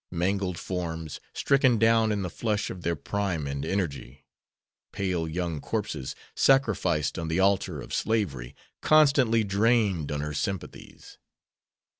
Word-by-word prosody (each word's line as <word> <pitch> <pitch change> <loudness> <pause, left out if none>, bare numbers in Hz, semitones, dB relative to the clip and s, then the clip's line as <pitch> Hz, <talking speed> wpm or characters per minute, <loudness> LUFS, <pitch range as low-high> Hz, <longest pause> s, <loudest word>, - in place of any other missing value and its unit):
Mangled 90 +1 -1
forms, 80 -4 -4
stricken 135 -4 +3
down 115 0 +4
in 100 -2 -1
the 90 - -3
flush 105 0 -2
of 90 - -8
their 85 0 -1
prime 90 -1 -2
and 70 0 -3
energy; 70 -9 -3 0.7
pale 90 -4 -2
young 85 -2 -3
corpses, 65 - -3 0.2
sacrificed 95 - +2
on 80 - -3
the 80 +3 0
altar 95 -4 +2
of - - -8
slavery, 80 - -1 0.3
constantly 140 -7 +4
drained 100 -5 +1
on 75 0 -2
her 75 0 -4
sympathies. 95 +6 -6
95 Hz, 130 wpm, -27 LUFS, 80-110 Hz, 0.7 s, down